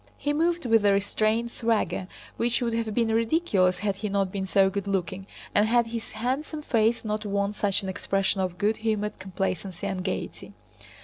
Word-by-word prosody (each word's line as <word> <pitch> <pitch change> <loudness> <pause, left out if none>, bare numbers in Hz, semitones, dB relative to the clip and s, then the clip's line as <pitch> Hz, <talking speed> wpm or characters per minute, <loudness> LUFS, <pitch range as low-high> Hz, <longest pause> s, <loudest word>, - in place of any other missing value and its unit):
He 290 - -1
moved 335 +1 +1
with 225 -3 +4
a 200 -1 +5
restrained 215 +3 +1
swagger 225 -6 0 0.3
which 240 0 +1
would 235 -2 -1
have 225 -1 -1
been 230 +1 +1
ridiculous 225 - +2
had 200 -1 -1
he 210 +1 -3
not 195 -1 0
been 190 -1 -3
so 195 0 +4
good 200 0 -3
looking 190 0 -2 0.3
and 210 +1 +4
had 235 +1 +4
his 230 0 -6
handsome 270 +7 -2
face 230 -3 +2
not 215 0 -2
worn 200 0 -1
such 205 -1 0
an 190 - -3
expression 195 0 0
of 180 -1 -2
good 210 +3 +1
humored 215 -1 -1
complacency 190 0 -3
and 190 -2 -2
gaiety. 190 - -4
210 Hz, 185 wpm, -26 LUFS, 195-230 Hz, 0.3 s, a